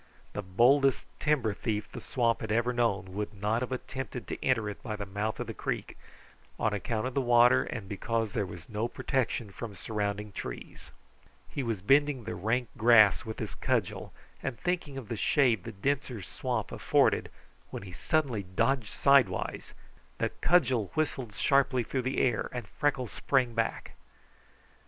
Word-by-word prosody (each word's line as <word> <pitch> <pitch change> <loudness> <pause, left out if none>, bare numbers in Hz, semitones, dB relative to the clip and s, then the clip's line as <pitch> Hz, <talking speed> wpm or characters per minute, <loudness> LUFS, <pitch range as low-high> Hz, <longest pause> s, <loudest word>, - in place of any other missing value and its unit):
The 105 - -3
boldest 125 +8 +3
timber 135 -8 +1
thief 105 0 -2
the - - -7
swamp 120 -3 +1
ever 115 +3 +1
had - - -6
known 100 -6 0
would 105 +1 -4
not 105 +4 0
have 125 - -3
attempted 130 -1 -5
to - - -5
enter 115 -5 +2
it 105 +6 -6
by 115 -6 -4
the 105 -1 -5
mouth 105 +3 -3
of - - -2
the - - -6
creek, - - -4 0.6
on 110 -1 +1
account 110 +3 -2
of 130 - -3
the 140 - +1
water 120 +1 +5
and 110 -5 -5
because 110 +2 -1
there 100 -4 0
was 85 -2 -10
no 110 +1 -2
protection 120 -5 -1
from 105 +1 -7
surrounding 105 +1 -3
trees. 60 -10 -7 0.6
He 140 - -4
was 115 -7 -2
bending 140 +1 +3
the - - -4
rank 115 +7 -1
grass 110 -2 +6
with 110 -1 -5
his - - -4
cudgel, - - -1 0.3
and 120 - -4
thinking 175 -6 -2
of 130 -5 -7
the 115 - -3
shade 120 - +2
the 115 - -5
denser 125 0 -2
swamp - - -3
afforded, - - +2 0.4
when - - -6
he 95 - -9
suddenly 130 - 0
dodged 105 +5 0
sidewise; 140 -2 +2 0.4
the - - 0
cudgel 130 - +2
whistled 130 -8 -1
sharply 135 -3 +3
through 130 +3 -2
the 130 +2 -2
air 120 -4 +1
and 120 -4 -5
Freckles 135 -6 -1
sprang 130 -4 +1
back. 115 -1 -2
115 Hz, 170 wpm, -30 LUFS, 105-130 Hz, 0.6 s, grass